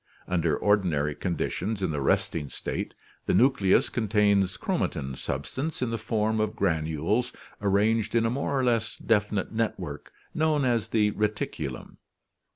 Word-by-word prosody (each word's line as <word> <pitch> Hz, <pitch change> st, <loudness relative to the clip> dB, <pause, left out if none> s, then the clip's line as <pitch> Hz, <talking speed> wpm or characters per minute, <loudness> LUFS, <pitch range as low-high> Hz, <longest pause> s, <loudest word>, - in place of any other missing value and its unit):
Under 85 Hz, -4 st, +1 dB
ordinary 85 Hz, -8 st, +2 dB
conditions 95 Hz, +5 st, -2 dB
in 90 Hz, -, +1 dB
the 75 Hz, -2 st, -2 dB
resting 70 Hz, +2 st, 0 dB
state -, -, -4 dB, 0.3 s
the -, -, +3 dB
nucleus 120 Hz, -7 st, +4 dB
contains 105 Hz, -4 st, +2 dB
chromatin 65 Hz, 0 st, -2 dB
substance 130 Hz, -, -3 dB
in 125 Hz, -2 st, -1 dB
the 115 Hz, -, -2 dB
form 110 Hz, 0 st, 0 dB
of 110 Hz, 0 st, 0 dB
granules 85 Hz, +7 st, 0 dB, 0.3 s
ar 100 Hz, -, +1 dB
ranged 110 Hz, +3 st, +2 dB
in 115 Hz, -1 st, +3 dB
a 115 Hz, -, +1 dB
more 140 Hz, +1 st, -1 dB
or -, -, +1 dB
less 115 Hz, -2 st, +1 dB
definite 105 Hz, -3 st, 0 dB
network 95 Hz, -9 st, -3 dB, 0.2 s
known 155 Hz, -3 st, +2 dB
as 120 Hz, -3 st, +1 dB
the 105 Hz, -2 st, +2 dB
reticulum. 105 Hz, 0 st, -3 dB
105 Hz, 145 wpm, -27 LUFS, 90-115 Hz, 0.3 s, nucleus